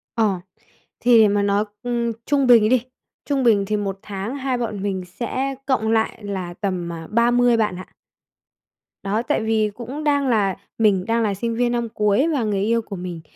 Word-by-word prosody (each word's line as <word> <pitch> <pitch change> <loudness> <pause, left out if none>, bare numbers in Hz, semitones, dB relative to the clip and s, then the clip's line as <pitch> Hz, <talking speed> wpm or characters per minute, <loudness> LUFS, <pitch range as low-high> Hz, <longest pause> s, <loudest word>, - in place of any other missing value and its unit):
Ờ. 210 -5 +1 0.6
Thì 240 -1 +5
để 215 - +7
mà 205 0 +1
nói, 200 +1 +1 0.2
ừm, 235 -1 -1
trung 275 -2 +2
bình 230 -3 +6
đi, 250 -1 +2 0.4
trung 275 -3 0
bình 205 -4 +4
thì 210 0 0
1 195 -1 -3
tháng 205 +5 -5
hai 265 -2 -1
bọn 215 -5 -3
mình 190 -2 -2
sẽ 260 +8 -3
cộng 225 -5 +1
lại 225 0 0
là 190 -3 -4
tầm, 180 -3 -3
à, 165 -1 -8
30 240 +1 +3
bạn 210 -4 0
ạ. 185 - -9 1.2
Đó, 205 +3 0
tại - - 0
vì 220 -1 +1
cũng 260 +6 -6
đang 285 -2 +2
là 205 -6 +2 0.2
mình 200 -4 +2
đang 230 0 +1
là 205 -2 +1
sinh 230 +3 -3
viên 240 0 +1
năm 235 -1 -1
cuối 210 +8 +2
và 260 -5 0
người 205 -2 0
yêu 230 +2 +1
của 205 -2 -8
mình 175 -2 -6
220 Hz, 200 wpm, -22 LUFS, 200-240 Hz, 1.2 s, để